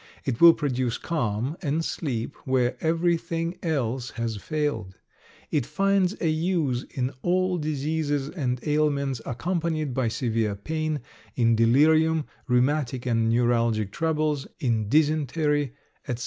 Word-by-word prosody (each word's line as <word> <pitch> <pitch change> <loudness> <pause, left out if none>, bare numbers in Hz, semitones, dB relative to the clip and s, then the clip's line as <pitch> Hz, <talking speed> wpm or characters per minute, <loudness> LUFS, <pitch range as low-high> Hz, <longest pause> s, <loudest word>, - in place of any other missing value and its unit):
It 125 -4 -2
will 170 -1 +9
produce 130 -5 -1
calm 130 -1 -2
and 160 0 -1
sleep 130 -4 -3
where 130 -2 +1
everything 165 +1 0
else 130 -6 -1
has 115 -2 -2
failed. 115 -7 -2 0.6
It 150 -4 +2
finds 195 - +1
a 165 - 0
use 155 -6 0
in 130 0 -2
all 180 0 +1
diseases 150 -1 -1
and 130 -7 -2
ailments 140 -4 +1
accompanied 155 +1 -1
by 130 -1 0
severe 115 -2 -1
pain, 155 +6 -2 0.3
in 115 -2 +3
delirium, 155 +7 +4 0.2
rheumatic 130 0 +1
and 115 -2 +1
neuralgic 115 -3 +2
troubles, 155 -2 0
in 110 -5 0
dysentery, 150 -1 +1 0.3
etc. 120 -1 -3
145 Hz, 120 wpm, -26 LUFS, 120-160 Hz, 0.6 s, will